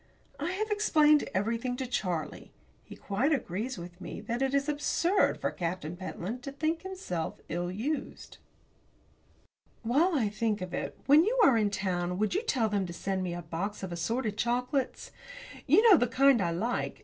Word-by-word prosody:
I 320 Hz, +6 st, -2 dB
have 430 Hz, +3 st, -2 dB
explained 305 Hz, -8 st, +4 dB
everything 230 Hz, +5 st, -1 dB
to 260 Hz, -, -3 dB
Charlie. 180 Hz, -10 st, -3 dB, 0.3 s
He -, -, -11 dB
quite 235 Hz, +9 st, -1 dB
agrees 235 Hz, -, -2 dB
with 175 Hz, +1 st, -10 dB
me -, -, -6 dB
that 240 Hz, +1 st, -3 dB
it 270 Hz, +1 st, +1 dB
is 280 Hz, +1 st, +1 dB
absurd 335 Hz, +6 st, +1 dB
for -, -, -1 dB
Captain 170 Hz, -2 st, -4 dB
Pentland 190 Hz, +5 st, -5 dB
to 275 Hz, +1 st, -6 dB
think 315 Hz, +3 st, -1 dB
himself 370 Hz, -, -5 dB
ill 175 Hz, +2 st, -2 dB
used. 270 Hz, +11 st, -4 dB, 1.4 s
While 305 Hz, +10 st, +2 dB
I 240 Hz, -7 st, +2 dB
think 215 Hz, 0 st, -1 dB
of 185 Hz, -1 st, -6 dB
it, -, -, -4 dB
when 295 Hz, +3 st, +7 dB
you 480 Hz, +6 st, 0 dB
are 270 Hz, -, +6 dB
in 215 Hz, -2 st, +2 dB
town 180 Hz, -3 st, -2 dB
will 215 Hz, +2 st, +1 dB
you 395 Hz, -, 0 dB
tell 260 Hz, -, +1 dB
them 200 Hz, -3 st, -1 dB
to 175 Hz, -, -7 dB
send 190 Hz, +2 st, -2 dB
me 175 Hz, -2 st, -3 dB
a 175 Hz, -, -6 dB
box 185 Hz, +6 st, -4 dB
of 185 Hz, -, -4 dB
assorted 215 Hz, +6 st, -2 dB
chocolates? 250 Hz, +4 st, -1 dB, 0.6 s
You 390 Hz, -, +6 dB
know 400 Hz, -6 st, +9 dB
the 245 Hz, -, +2 dB
kind 270 Hz, -1 st, +4 dB
I 175 Hz, -, +1 dB
like. 215 Hz, +9 st, -2 dB
230 Hz, 180 wpm, -29 LUFS, 185-290 Hz, 1.4 s, know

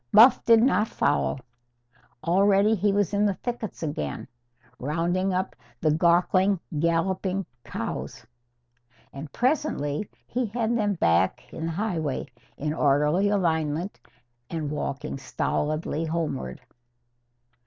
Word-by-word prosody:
Buff 235 Hz, +4 st, +7 dB
did 230 Hz, -1 st, +6 dB
not 215 Hz, -4 st, +3 dB
follow. 145 Hz, -7 st, 0 dB, 0.9 s
Already 195 Hz, +5 st, +4 dB
he 205 Hz, -1 st, +2 dB
was 200 Hz, -1 st, +1 dB
in 205 Hz, +1 st, +2 dB
the 200 Hz, -2 st, +2 dB
thickets 235 Hz, -6 st, -5 dB
again, 75 Hz, -, -3 dB, 0.5 s
rounding 170 Hz, +7 st, 0 dB
up 185 Hz, +1 st, -2 dB, 0.2 s
the 155 Hz, -4 st, +2 dB
gawkily 180 Hz, +4 st, +3 dB, 0.2 s
galloping 185 Hz, +3 st, 0 dB, 0.2 s
cows. 120 Hz, +1 st, -5 dB, 0.9 s
And 140 Hz, +1 st, -8 dB
presently 230 Hz, -, 0 dB, 0.2 s
he 250 Hz, 0 st, -2 dB
had 230 Hz, +2 st, -1 dB
them 210 Hz, -3 st, +1 dB
back 85 Hz, -, +2 dB
in 160 Hz, 0 st, -4 dB
the -, -, -2 dB
highway, 165 Hz, -7 st, -2 dB, 0.3 s
in 150 Hz, +1 st, -2 dB
orderly 150 Hz, +6 st, +3 dB
alignment 165 Hz, -2 st, 0 dB, 0.5 s
and 155 Hz, -3 st, -3 dB
walking 140 Hz, -2 st, -4 dB
stolidly 155 Hz, +4 st, -2 dB
homeward. 155 Hz, -, -3 dB
175 Hz, 110 wpm, -26 LUFS, 150-205 Hz, 0.9 s, Buff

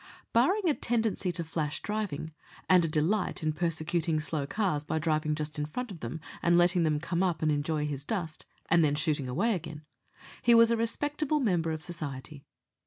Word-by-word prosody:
Barring 365 Hz, -, +3 dB
a 310 Hz, -, +4 dB
tendency 225 Hz, -8 st, 0 dB
to 170 Hz, -, 0 dB
flash 155 Hz, -2 st, -3 dB
driving, 200 Hz, -8 st, -3 dB, 0.3 s
and 185 Hz, -2 st, +6 dB
a -, -, +1 dB
delight 165 Hz, +5 st, 0 dB
in 155 Hz, 0 st, +1 dB
persecuting 165 Hz, 0 st, 0 dB
slow 150 Hz, -2 st, -2 dB
cars 185 Hz, -6 st, 0 dB
by 160 Hz, -, -2 dB
driving 155 Hz, -1 st, 0 dB
just 150 Hz, 0 st, -3 dB
in 150 Hz, -, -1 dB
front 250 Hz, +8 st, -5 dB
of 175 Hz, -, -9 dB
them 120 Hz, +6 st, -5 dB, 0.2 s
and 170 Hz, 0 st, +4 dB
letting 175 Hz, +1 st, +4 dB
them 155 Hz, -2 st, +2 dB
come 170 Hz, +2 st, -2 dB
up 175 Hz, -4 st, 0 dB
and 155 Hz, -, +3 dB
enjoy 150 Hz, +1 st, 0 dB
his 140 Hz, -2 st, -4 dB
dust, 160 Hz, -4 st, -4 dB, 0.2 s
and 170 Hz, -1 st, +4 dB
then 145 Hz, -1 st, +2 dB
shooting 150 Hz, -3 st, -1 dB
away 200 Hz, -, +1 dB
again, 155 Hz, -4 st, -6 dB, 0.6 s
he 235 Hz, -1 st, +5 dB
was 230 Hz, 0 st, +7 dB
a -, -, +4 dB
respectable 290 Hz, +6 st, 0 dB
member 175 Hz, -, +1 dB
of 155 Hz, 0 st, -1 dB
society. 150 Hz, -3 st, -7 dB
165 Hz, 190 wpm, -29 LUFS, 150-205 Hz, 0.6 s, was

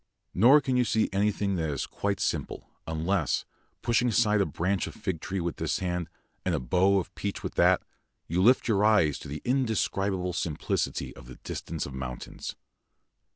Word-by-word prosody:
Nor 130 Hz, +10 st, +7 dB
can 130 Hz, -2 st, 0 dB
you 125 Hz, -, +4 dB
see 110 Hz, -2 st, +1 dB
anything 100 Hz, -1 st, +1 dB
that 80 Hz, -2 st, -1 dB
is 70 Hz, -3 st, -2 dB
quite 100 Hz, -1 st, -2 dB
simple, -, -, -3 dB, 0.2 s
unless, 80 Hz, 0 st, 0 dB, 0.4 s
pushing 120 Hz, +1 st, +2 dB
aside 105 Hz, -2 st, +3 dB
a 100 Hz, -, +1 dB
branch 90 Hz, +6 st, -1 dB
of -, -, -9 dB
fig 85 Hz, -4 st, -3 dB
tree 95 Hz, 0 st, -3 dB
with 85 Hz, -2 st, -3 dB
this -, -, -1 dB
hand, 90 Hz, -2 st, -2 dB, 0.3 s
and -, -, +1 dB
a -, -, 0 dB
bough 95 Hz, +10 st, +3 dB
of 95 Hz, -, -3 dB
peach 100 Hz, -1 st, -4 dB
with -, -, -4 dB
that, -, -, +4 dB, 0.4 s
you 85 Hz, +3 st, +1 dB
lift 125 Hz, +7 st, +5 dB
your 105 Hz, -3 st, +2 dB
eyes 105 Hz, -10 st, +4 dB
to -, -, -9 dB
the 75 Hz, +2 st, -6 dB
indescribable 100 Hz, -7 st, 0 dB
simplicity 85 Hz, -4 st, -2 dB
of 60 Hz, -3 st, -13 dB
the 65 Hz, -, -10 dB
distance -, -, -4 dB
of 70 Hz, -, -8 dB
mountains. 65 Hz, -2 st, -6 dB
95 Hz, 180 wpm, -28 LUFS, 80-105 Hz, 0.4 s, Nor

